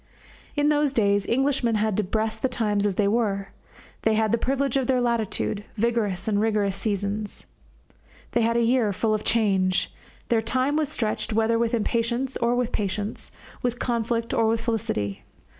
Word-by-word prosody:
In 290 0 +3
those 295 -2 +2
days 200 -4 +2
Englishmen 255 -2 +1
had 215 -1 +1
to 215 - +2
breast 220 +3 -2
the 260 - +1
times 210 -3 +1
as 195 - -1
they 205 0 +2
were. 200 -3 0 0.5
They 220 0 +2
had 220 -1 +2
the 235 - +2
privilege 275 +1 0
of 265 -3 +1
their 260 -1 +2
latitude 230 -3 -1
vigorous 220 -4 0
and 205 -1 +2
rigorous 210 -3 +1
seasons. 200 +1 -2 0.9
They 235 - +2
had 230 +1 +2
a 235 - +3
year 230 -3 +2
full 215 +3 0
of 215 - -1
change 195 -5 +1 0.4
their 230 -2 +3
time 255 +5 0
was 305 -2 +1
stretched 215 -5 -2
whether 225 +1 +2
with 235 0 +1
impatience 235 +3 -1
or 235 +1 +1
with 245 -1 0
patience, 205 +1 -3 0.3
with 245 -1 -1
conflict 230 -1 -1
or 225 - +3
with 225 0 +1
felicity. 210 - -2
225 Hz, 175 wpm, -25 LUFS, 210-240 Hz, 0.9 s, In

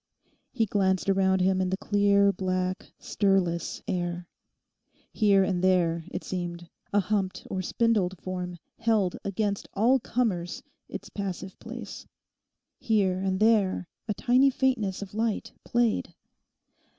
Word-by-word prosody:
He 230 -3 +1
glanced 190 -2 +1
around 190 -1 +2
him 190 0 +2
in 185 - 0
the 190 - -1
clear, 200 -1 +3
black, 185 0 -2
stirless 190 -4 0
air. 175 -1 -2 0.9
Here 200 -3 +4
and 185 -2 -1
there, 170 -3 +2
it - - -5
seemed, 175 -2 -4 0.2
a 205 - +3
humped 195 -1 -1
or 190 - -1
spindled 190 -3 +1
form 180 -1 -5 0.2
held 220 -5 +2
against 200 0 -2
all 240 +6 +4
comers 205 -9 -1 0.3
its - - -7
passive 190 -1 -5
place. - - -8 0.7
Here 195 -5 +1
and 190 0 -1
there 210 -5 +3 0.2
a 210 - -1
tiny 255 +5 +4
faintness 245 -8 0
of 195 - -11
light 220 0 -1
played. 240 -2 0
195 Hz, 125 wpm, -27 LUFS, 185-215 Hz, 0.9 s, Here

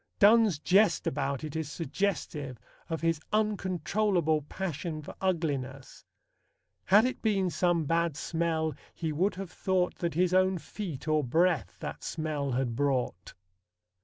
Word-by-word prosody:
Donne's 215 -4 +6
jest 195 +7 +3
about 140 0 -1
it 155 -1 -6
is 160 -2 -3
suggestive 155 -5 -2 0.3
of 165 -1 -2
his 165 -2 +1
uncontrollable 190 -5 +1
passion 155 0 -4
for - - -8
ugliness: 140 -8 -2 0.8
Had 205 +5 +6
it 255 - -2
been 195 -5 +1
some 175 -2 +1
bad 165 -1 +1
smell, 160 -1 -1 0.2
he 160 -2 -2
would 180 +7 +1
have 190 -2 -6
thought 185 -1 0
That 170 -3 -2
his 180 +1 +2
own 185 0 +3
feet, 170 -5 -6
or 155 -1 +2
breath, 145 - +1
that - - -6
smell 150 -4 -2
had 120 -2 -1
brought. 130 -8 -1
165 Hz, 135 wpm, -29 LUFS, 150-185 Hz, 0.8 s, Donne's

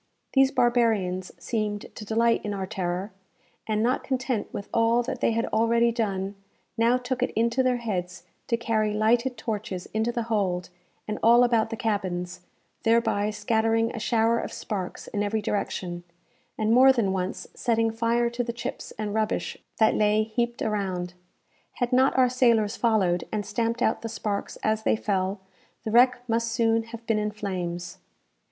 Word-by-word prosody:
These 270 -1 +5
barbarians 220 -8 +1
seemed 210 -3 -2
to - - -8
delight 230 +2 +2
in 205 -1 -3
our 190 -1 -3
terror; 185 0 -3 0.6
and, 215 0 +1
not 250 +3 +1
content 255 -4 -2
with 200 - -6
all 230 +1 +3
that 260 - -5
they - - +3
had 230 +1 0
already 235 +1 +3
done, 200 -4 -2 0.4
now 230 +2 +3
took 250 0 -3
it 250 - +2
into 235 +3 +2
their 255 -1 +2
heads 180 -6 -4 0.2
to 235 - +1
carry 215 -2 0
lighted 235 +4 +2
torches 215 -4 -4
into 220 +2 +1
the 235 -1 -2
hold, 195 -6 -1 0.4
and 215 - -3
all 235 +2 +6
about 230 -2 +2
the 225 - -3
cabins, 185 -5 -2 0.4
thereby 225 -2 +2
scattering 225 +2 +1
a - - -4
shower 230 +1 +2
of - - -5
sparks 190 -4 -5
in 205 - -2
every 205 +2 0
direction, 180 -4 -3 0.5
and 215 0 +1
more 260 +2 +8
than 225 -7 +1
once 185 0 -3
setting 225 -1 +1
fire 230 +1 +1
to 240 +1 -2
the 235 0 -4
chips 235 - -6
and 210 -1 -3
rubbish 215 -1 -1 0.2
that 220 -1 +4
lay 210 0 +3
heaped 235 +2 -2
around. 185 -4 -2 0.6
Had 245 0 -2
not 260 +1 +4
our 255 -1 +6
sailors 235 -4 +2
followed, 195 -7 +1
and 210 -2 -2
stamped 230 +4 -1
out 220 - +1
the 225 - -4
sparks 205 -2 -3
as 215 0 +1
they - - +2
fell, 195 -2 -1 0.4
the 220 - -3
wreck 245 +1 +4
must 230 0 0
soon 225 -1 +2
have 230 0 -10
been 225 -2 +1
in 210 0 -1
flames. 180 -4 -5
220 Hz, 170 wpm, -26 LUFS, 205-235 Hz, 0.6 s, more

